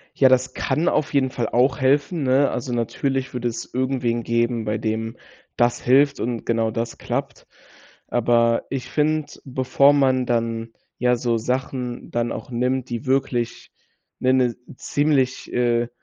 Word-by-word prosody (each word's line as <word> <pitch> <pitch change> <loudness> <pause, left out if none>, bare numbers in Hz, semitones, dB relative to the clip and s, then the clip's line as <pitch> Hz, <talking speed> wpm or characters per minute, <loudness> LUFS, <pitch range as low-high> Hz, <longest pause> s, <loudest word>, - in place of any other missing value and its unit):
Ja, 135 - +6
das 130 0 +2
kann 165 +3 0
auf 150 - 0
jeden 135 -2 +2
Fall 120 -3 -2
auch 125 +4 +2
helfen, 145 +5 +1
ne? 135 +2 +3
Also, 130 - -4
natürlich 130 +3 -1
würde 125 -1 -2
es 115 0 -6
irgendwen 125 -2 0
geben, 115 0 0
bei 105 0 -1
dem 110 +1 -3 0.4
das 120 0 +2
hilft 140 +3 +4
und 120 0 -3
genau 115 -1 +1
das 115 +1 -4
klappt, - - -4 0.6
aber 115 -1 +2
ich 135 -2 -4
finde, 155 0 +1 0.2
bevor 130 +2 +3
man 130 -3 +3
dann, 115 -1 -1 0.3
ja, 125 0 +2
so 120 -1 0
Sachen 125 +1 -3
dann 120 0 -1
auch - - -7
nimmt, 125 +1 -1
die 120 +3 -4
wirklich 130 -3 -1 0.5
'ne 130 - +2
'ne 125 -3 +2 0.2
ziemlich, 140 -4 0
äh 120 -1 +1
125 Hz, 155 wpm, -22 LUFS, 115-135 Hz, 0.6 s, Ja